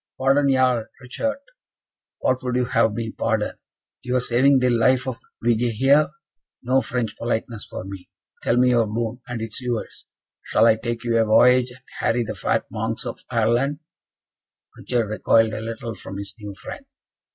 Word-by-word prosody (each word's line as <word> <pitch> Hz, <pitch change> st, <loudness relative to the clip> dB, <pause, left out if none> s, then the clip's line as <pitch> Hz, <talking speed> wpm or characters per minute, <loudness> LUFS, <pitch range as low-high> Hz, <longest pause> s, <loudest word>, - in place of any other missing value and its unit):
"Pardon, 135 Hz, +1 st, +3 dB
Jarl 130 Hz, -3 st, +2 dB
Richart! 275 Hz, -, -3 dB, 0.8 s
What 130 Hz, 0 st, +1 dB
would 125 Hz, -1 st, -2 dB
you 125 Hz, 0 st, +2 dB
have 115 Hz, -3 st, +2 dB
me 115 Hz, -1 st, -3 dB
pardon? 110 Hz, -2 st, -1 dB, 0.4 s
your 125 Hz, 0 st, 0 dB
saving 130 Hz, +3 st, +3 dB
the 125 Hz, -1 st, +2 dB
life 125 Hz, +2 st, +3 dB
of 130 Hz, -3 st, -3 dB, 0.2 s
Vige 120 Hz, 0 st, +2 dB
here? 140 Hz, +6 st, +4 dB, 0.5 s
No 130 Hz, +2 st, +3 dB
French 120 Hz, -1 st, -2 dB
politeness 115 Hz, -1 st, -3 dB
for -, -, -6 dB
me. 95 Hz, -1 st, -9 dB, 0.3 s
Tell 115 Hz, -, +1 dB
me 125 Hz, 0 st, +5 dB
your 115 Hz, -2 st, +3 dB
boon, 115 Hz, +3 st, -3 dB
and 120 Hz, -2 st, -4 dB
it 115 Hz, -, -4 dB
is -, -, -6 dB
yours. 120 Hz, -2 st, -4 dB, 0.3 s
Shall -, -, +2 dB
I 110 Hz, -1 st, +5 dB
take 115 Hz, +1 st, -4 dB
you 115 Hz, -1 st, +2 dB
a 115 Hz, -, +3 dB
voyage, 125 Hz, +3 st, +5 dB
and 125 Hz, +1 st, -15 dB, 0.2 s
harry 120 Hz, +1 st, +1 dB
the 110 Hz, -1 st, -4 dB
fat 100 Hz, -, 0 dB
monks -, -, -3 dB
of -, -, -5 dB
Ireland?" 120 Hz, +5 st, +1 dB, 1.0 s
Richard 120 Hz, -3 st, -1 dB
recoiled 110 Hz, +1 st, +3 dB
a -, -, -4 dB
little 115 Hz, 0 st, -5 dB
from 95 Hz, -, -8 dB
his 100 Hz, 0 st, -7 dB
new 105 Hz, -2 st, -8 dB
friend. 195 Hz, -, -8 dB
120 Hz, 175 wpm, -23 LUFS, 115-125 Hz, 1.0 s, me